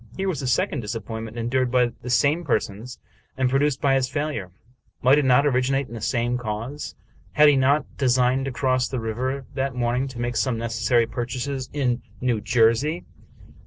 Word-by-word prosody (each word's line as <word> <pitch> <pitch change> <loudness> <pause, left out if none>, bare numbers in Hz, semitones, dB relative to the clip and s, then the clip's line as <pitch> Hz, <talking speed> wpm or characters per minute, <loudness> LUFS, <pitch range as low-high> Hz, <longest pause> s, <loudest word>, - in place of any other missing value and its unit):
Here 195 - -1
was 175 -6 -2
a 130 - -3
second 125 +4 +1
disappointment 110 0 -5
endured 125 +2 0
by 125 -1 +2
the 125 - -7
same 145 +7 +2
persons, 110 -1 -2 0.4
and 130 -1 +1
produced 140 0 +2
by 140 -1 +3
his 130 -1 +1
failure. 145 -11 -3 0.5
Might 135 +4 +6
it 145 - 0
not 130 +2 +4
originate 135 0 +1
in - - -10
the 115 - -6
same 120 +2 0
cause? 115 +5 -5 0.4
Had 150 0 +7
he 145 - +4
not 135 +2 +3
designed 130 0 +2
to 135 - -3
cross 130 0 +1
the 130 - -3
river 130 +5 -3
that 135 -1 -2
morn 120 0 0
ing 135 - -2
to 130 -3 -8
make 120 -1 -2
some 115 +3 0
necessary 115 +1 +1
purchases 125 +3 -4
in 125 -4 0 0.2
New 120 -4 0
Jersey? 120 +10 +2
125 Hz, 185 wpm, -24 LUFS, 120-135 Hz, 0.5 s, Had